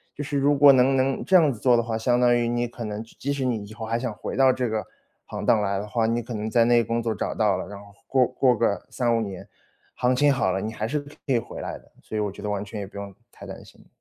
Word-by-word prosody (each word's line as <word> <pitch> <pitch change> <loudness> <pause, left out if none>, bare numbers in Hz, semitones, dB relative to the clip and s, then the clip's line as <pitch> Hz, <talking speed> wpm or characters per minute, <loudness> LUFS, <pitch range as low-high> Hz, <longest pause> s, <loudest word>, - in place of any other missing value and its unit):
就 145 - -4
是 145 0 -4
如 140 +1 +3
果 140 0 +8
能 130 +1 +4
能 130 0 0
这 190 - +2
样 155 -6 +5
子 110 - -11
做 125 0 +4
的 115 - +1
话， 115 -1 -3
相 120 +2 +1
当 120 -1 +4
于 120 -1 +1
你 120 0 0
可 120 0 -8
能 105 -1 -4
即 115 - -20
即 140 - -2
使 140 -2 -2
你 115 -5 -1
以 105 - -12
后 110 +1 -7
还 115 +1 -1
想 125 -1 -3
回 - - -6
到 135 0 +5
这 125 -1 -1
个 110 -1 -2 0.4
行 - - -5
当 110 - +4
来 100 -1 -1
的 100 - -4
话， 110 +1 0
你 115 +1 0
可 120 +2 -7
能 110 0 -3
在 115 +1 +3
那 120 0 +4
工 115 +2 -2
作 115 -1 0
找 100 - -3
到 105 -3 +2
了， 90 - -5
然 100 - -9
后 100 0 -15
过 130 -1 +3
过 125 0 +2
个 100 -3 0
3-5 120 -2 0
年， 100 -4 -6 0.5
行 125 +1 +1
情 145 +2 +4
好 115 -8 +1
了， 95 - -1
你 110 +3 -4
还 110 0 -3
是 150 +5 -1
可 145 0 -14 0.2
以 130 -3 +2
回 115 - -6
来 - - -5
的。 - - -23
所 110 - -6
以 - - 0
我 105 -1 -2
觉 100 - -11
得 105 - -4
完 100 0 -2
全 105 +1 -7
也 100 - -5
不 100 - -12
用 100 -1 -7 0.2
太 - - -12
担 - - -9
心。 - - -19
115 Hz, 325 characters per minute, -24 LUFS, 105-130 Hz, 0.5 s, 果